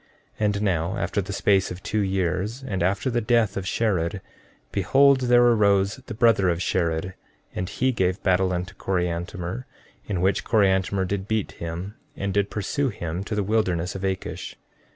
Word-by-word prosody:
14:3 110 Hz, -, +1 dB
And 100 Hz, -1 st, 0 dB
now, 90 Hz, +1 st, 0 dB
after 100 Hz, -, -1 dB
the 95 Hz, +1 st, -6 dB
space 100 Hz, -1 st, +2 dB
of 90 Hz, +2 st, -8 dB
two 110 Hz, -, -1 dB
years, 95 Hz, -, -1 dB
and 100 Hz, -9 st, -3 dB
after 95 Hz, +8 st, +1 dB
the 120 Hz, 0 st, +1 dB
death 110 Hz, -3 st, +2 dB
of 95 Hz, -1 st, -3 dB
Shared, 95 Hz, -4 st, 0 dB, 0.5 s
behold, 135 Hz, +8 st, +4 dB
there 120 Hz, -1 st, +4 dB
arose 100 Hz, -2 st, +3 dB
the 115 Hz, -, -6 dB
brother 110 Hz, -5 st, +4 dB
of 85 Hz, -1 st, 0 dB
Shared 85 Hz, 0 st, -1 dB, 0.4 s
and 90 Hz, +1 st, -3 dB
he 130 Hz, +5 st, +1 dB
gave 95 Hz, -5 st, 0 dB
battle 95 Hz, -1 st, +2 dB
unto 90 Hz, +1 st, -3 dB
Coriantumr, 90 Hz, +4 st, -3 dB, 0.4 s
in 95 Hz, -4 st, -1 dB
which 95 Hz, +2 st, +2 dB
Coriantumr 95 Hz, -2 st, +2 dB
did 95 Hz, +1 st, -3 dB
beat 110 Hz, -2 st, -1 dB
him 85 Hz, +4 st, -6 dB, 0.2 s
and 100 Hz, -1 st, -2 dB
did 100 Hz, 0 st, +1 dB
pursue 135 Hz, +7 st, -1 dB
him 85 Hz, -3 st, -4 dB
to 105 Hz, -, -3 dB
the 105 Hz, -, 0 dB
wilderness 95 Hz, -5 st, 0 dB
of 95 Hz, -, -6 dB
Akish. 95 Hz, -1 st, -4 dB
95 Hz, 175 wpm, -24 LUFS, 90-110 Hz, 0.5 s, behold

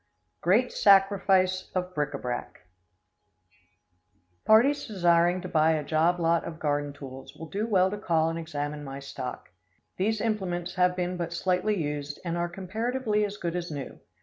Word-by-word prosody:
Great 220 Hz, +9 st, +3 dB
Sacrifice 195 Hz, -2 st, +4 dB
of 180 Hz, 0 st, -2 dB
Bric 145 Hz, -2 st, -1 dB
a -, -, -2 dB
brac. 125 Hz, -2 st, -5 dB, 1.8 s
Parties 245 Hz, +7 st, +4 dB
desiring 175 Hz, -3 st, +3 dB
to -, -, -6 dB
buy 160 Hz, 0 st, +3 dB
a 155 Hz, -1 st, -1 dB
job 160 Hz, +4 st, +2 dB
lot 165 Hz, 0 st, +2 dB
of 160 Hz, -1 st, -7 dB
garden 145 Hz, -1 st, -1 dB
tools, 135 Hz, -2 st, -10 dB
will 160 Hz, -, -8 dB
do 205 Hz, +8 st, -2 dB
well 190 Hz, -3 st, +3 dB
to 205 Hz, -, -4 dB
call 160 Hz, -5 st, +1 dB
and 165 Hz, 0 st, -2 dB
examine 150 Hz, -2 st, -4 dB
my 135 Hz, -1 st, -7 dB
stock. 135 Hz, -2 st, -7 dB, 0.5 s
These 215 Hz, +3 st, 0 dB
implements 185 Hz, -6 st, -2 dB
have 180 Hz, -1 st, +2 dB
been 180 Hz, 0 st, -2 dB
but 170 Hz, -1 st, -3 dB
slightly 185 Hz, +4 st, +1 dB
used, 145 Hz, -1 st, -4 dB
and 170 Hz, -1 st, -1 dB
are 175 Hz, 0 st, -1 dB
comparatively 215 Hz, +5 st, -1 dB
as 205 Hz, 0 st, -3 dB
good 175 Hz, -3 st, -3 dB
as 175 Hz, -1 st, -3 dB
new. 145 Hz, -3 st, -7 dB
175 Hz, 165 wpm, -27 LUFS, 155-195 Hz, 1.8 s, Sacrifice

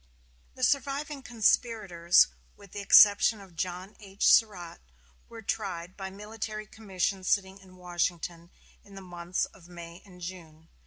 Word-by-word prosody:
The 255 Hz, -, -7 dB
surviving 280 Hz, +1 st, 0 dB
conspirators, 215 Hz, -7 st, +2 dB, 0.3 s
with 200 Hz, -2 st, -16 dB
the 205 Hz, -, -6 dB
exception 205 Hz, +2 st, +6 dB
of 190 Hz, -4 st, -15 dB
John 180 Hz, +3 st, -5 dB
H. 200 Hz, -2 st, -2 dB
Surratt, 185 Hz, -7 st, +1 dB, 0.5 s
were 225 Hz, -1 st, -11 dB
tried 185 Hz, -4 st, -4 dB
by 190 Hz, -1 st, -6 dB
military 215 Hz, +2 st, -7 dB
commission 195 Hz, -3 st, -3 dB
sitting 190 Hz, 0 st, 0 dB
in 185 Hz, -1 st, -17 dB
Washington 175 Hz, -1 st, -3 dB, 0.3 s
in 200 Hz, -1 st, -16 dB
the 195 Hz, -, -9 dB
months 175 Hz, 0 st, -3 dB
of 175 Hz, -3 st, -18 dB
May 170 Hz, 0 st, -11 dB
and 185 Hz, -3 st, -16 dB
June. 165 Hz, -3 st, -10 dB
190 Hz, 140 wpm, -28 LUFS, 175-215 Hz, 0.5 s, exception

